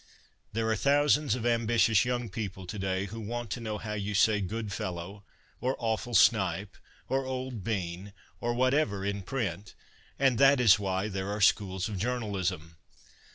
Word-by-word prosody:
There 110 +1 0
are 110 - +2
thousands 145 +2 +3
of 120 -2 -5
ambitious 115 -2 +3
young 120 -1 -1
people 95 -4 -5
to 105 +3 -6
day 95 0 -1
who 110 +3 -7
want 120 0 -5
to 125 - -2
know 110 -2 -4
how 105 0 -5
you 105 0 -3
say 105 +1 +4
good 105 +2 -4
fellow, 95 +3 -5 0.4
or 130 +2 0
awful 115 +1 -2
snipe, 100 -3 +3 0.3
or 135 +1 0
old 130 -4 -4
bean, 95 -2 -3 0.3
or 120 0 -1
whatever, 130 -6 +1
in 100 0 -2
print, 100 -4 -4 0.4
and 130 -4 +2
that 140 0 +6
is 110 -5 +6
why 95 0 -1
there 95 -1 -4
are 105 +1 -3
Schools 95 -2 +2
of 105 -4 -5
Journalism. 95 -8 -2
105 Hz, 165 wpm, -29 LUFS, 95-120 Hz, 0.4 s, that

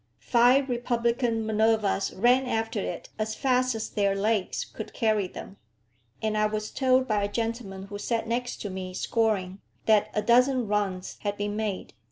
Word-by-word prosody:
Five 250 +3 +4
republican 235 -2 0
Minervas 220 -2 +1
ran 250 +5 +4
after 225 -2 -1
it - - -5
as 220 0 -2
fast 255 -2 +1
as 220 - -3
their 200 -1 0
legs 205 -1 0
could - - -9
carry 215 -5 +1
them; 195 +2 -10 0.7
and 215 -1 0
I 215 0 +3
was 215 0 -4
told 260 -1 +2
by 210 -2 +1
a 205 - -2
gentleman 225 -4 -3
who 205 +1 -7
sat 230 +1 -1
next 245 +2 -2
to 205 - -4
me 185 -1 -6
scoring, 200 -4 0 0.2
that 215 -2 +4
a 210 - +1
dozen 250 0 +4
runs 195 -3 -2
had 205 -1 -3
been 205 0 -2
made. 210 -3 -3
220 Hz, 170 wpm, -27 LUFS, 205-240 Hz, 0.7 s, Five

